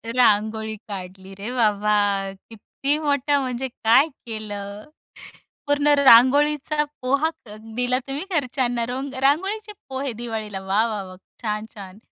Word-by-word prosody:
रांगोळी 220 -2 +2
काढली 190 -1 -8
रे 210 +5 -5
बाबा! 205 -3 +2 0.2
किती 275 +6 -3
मोठा! 285 -1 +1
म्हणजे 260 0 -2 0.2
काय 245 +7 +6 0.2
केलं? 205 -2 -6 0.8
पूर्ण 290 0 +2
रांगोळीचा 285 +4 +5 0.2
पोहा 280 +5 +2 0.2
क 210 -1 -10 0.2
दिला 250 +1 +1
तुम्ही 280 +5 -3 0.2
घरच्यांना. 245 -3 -1
रोंग 265 +3 -4
रांगोळीचे 385 +10 +1 0.2
पोहे 265 0 -3
दिवाळीला 220 -3 -5
वा! 200 +4 +2
वा! 210 -3 -3
वा! 185 0 -11 0.3
छान! 215 -1 -2
छान! 195 -1 -10
235 Hz, 125 wpm, -23 LUFS, 210-275 Hz, 0.8 s, काय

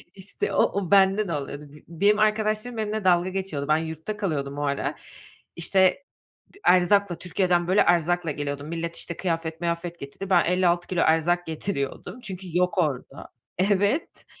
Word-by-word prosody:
İşte 205 - -4
o, - - +4
o 200 -3 -1
bende 195 +1 +4
de 170 - -2
oluyordu. 145 0 -5 0.2
B 165 0 -12
benim 210 +1 +4
arkadaşlarım 215 +2 +1
benimle 215 -1 -2
dalga 180 0 +3
geçiyordu. 185 -7 -4
Ben 155 - +4
yurtta 160 +6 -5
kalıyordum 145 -8 -3
o - - -3
ara. 140 -1 -1 0.6
İşte, 190 +8 +2 0.5
d 400 - -18
erzakla, 185 0 +4
Türkiye'den, 180 -1 0
böyle, 190 +3 +4
erzakla 175 -1 +2
geliyordum. 145 0 -4
Millet, 170 0 -4
işte, 170 - -4
kıyafet, 165 -2 -3
mıyafet 170 0 -3
getirdi. 140 +8 -8
Ben 180 -3 +4
56 175 0 +1
kilo 180 -2 0
erzak 170 +2 +2
getiriyordum. 160 - -4
Çünkü 190 -4 -6
yok 180 +1 +1
orada. 150 -8 -2 0.3
Evet. 200 - 0
175 Hz, 160 wpm, -25 LUFS, 165-195 Hz, 0.6 s, o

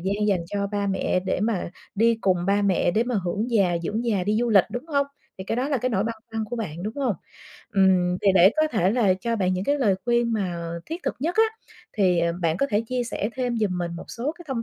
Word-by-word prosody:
gian 200 +3 -1
dành 190 -4 +2
cho 200 +1 -2
ba 200 0 0
mẹ 190 -1 0
để 185 - -2
mà 210 -5 -1 0.2
đi 230 +3 +4
cùng 185 -2 +3
ba 200 +1 +2
mẹ, 190 -3 +2
để 220 +6 +2
mà 245 -1 -2
hưởng 210 +7 -2
già, 190 -7 +3
dưỡng 215 +7 -2
già, 200 -6 0
đi 210 +1 +1
du 240 - 0
lịch, 195 -4 +6
đúng 245 +6 -5
hông? 280 -3 +1 0.3
Thì 190 - -6
cái 225 - -2
đó 260 +3 0
là 280 - +1
cái 255 - 0
nỗi 210 -3 0
băn 230 - -2 0.2
khoăn 225 -1 -2
của 240 +3 -5
bạn, 175 -7 -5
đúng 215 +3 -4
hông? 260 -6 0 0.6
Ừm, 185 -2 +3
thì 200 - +4
để 185 +1 +7
có 310 0 +3
thể 195 - +1
là 215 -5 +3
cho 230 +5 -2
bạn 185 -2 +1
những 185 +1 -2
cái 285 +4 +1
lời 205 -7 +3
khuyên 235 -1 +2
mà 190 -6 -1 0.3
thiết 330 +3 -5
thực - - -1
nhất 340 +7 -1
á 445 - +6 0.5
thì, 185 -5 +2
ờ, 170 0 +1
bạn 165 0 +1
có 275 - +1
thể 205 +1 +2
chia 250 0 -1
sẻ 225 -1 -3
thêm 245 -2 -1
giùm 195 -4 0
mình 175 -1 -2
một - - -8
số 250 +6 -3
cái 350 - -11
thông 240 -4 -2
210 Hz, 265 wpm, -24 LUFS, 185-240 Hz, 0.6 s, để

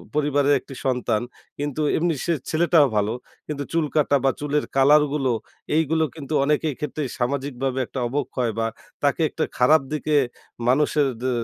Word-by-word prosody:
পরিবারের 145 -1 +2
একটি 135 - -12
সন্তান। 125 -4 +1 0.4
কিন্তু 145 +1 -2 0.2
এমনি 170 0 +1
সে 170 - +2 0.2
ছেলেটাও 160 -2 +4
ভালো। 105 +2 +1 0.3
কিন্তু 145 -2 -3
চুল 165 -2 +2
কাটা 145 -2 +3
বা 135 - +4
চুলের 145 0 0
কালার 145 +3 +6
গুলো 135 -4 +1 0.4
এইগুলো 160 0 +2
কিন্তু 155 -1 -6
অনেকের 150 +1 +1
ক্ষেত্রেই 150 -2 -3
সামাজিকভাবে 135 0 -1
একটা 130 - -6
অবক্ষয় 125 -3 -1
বা 115 - +1 0.4
তাকে - - +2
একটা - - -2
খারাপ 150 +5 +5
দিকে 155 0 0 0.5
মানুষের 145 +2 +3
দে 130 - 0
145 Hz, 150 wpm, -23 LUFS, 130-150 Hz, 0.5 s, কালার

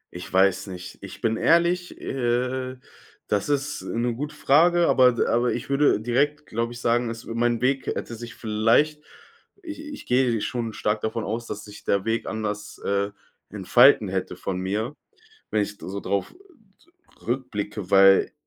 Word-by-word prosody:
Ich 90 - -8
weiß 95 +1 +3
nicht. 90 -1 -9
Ich - - -10
bin 115 0 +1
ehrlich, 170 +2 +2
äh, 130 +1 -2 0.5
das 105 +5 -1
ist 145 0 -1
'ne 120 +1 -2
gute 145 +5 -5
Frage, 170 +4 +4
aber 125 -1 +5
d 120 - 0
aber 120 +1 +1
ich 120 - -5
würde 140 -3 +3
direkt, 140 +7 0
glaube 115 +1 -3
ich, 120 - -9
sagen, 120 0 +1
es 115 0 -7
mein 120 0 0
Weg 130 +1 +1
hätte - - -3
sich 120 +1 -8
vielleicht 115 +8 +2 0.6
ich 310 -3 -7
ich 295 -1 -9
gehe 125 -2 +2
schon 115 -2 -3
stark 105 +1 -1
davon 110 0 -2
aus, 115 +2 -4
dass 105 0 -6
sich 105 0 -12
der 100 -1 0
Weg 115 +1 -1
anders, 105 -1 -4
äh, 100 0 0 0.4
entfalten 110 +4 +5
hätte 95 -1 -3
von 90 +1 -4
mir, 105 +8 -2 0.6
wenn 105 - +2
ich 100 - -3
s 105 - -21
so 100 +2 -6
drauf 100 0 -2 0.9
r - - -19
rückblicke, 105 -6 -3
weil, 95 0 +6
115 Hz, 170 wpm, -24 LUFS, 105-130 Hz, 0.9 s, weil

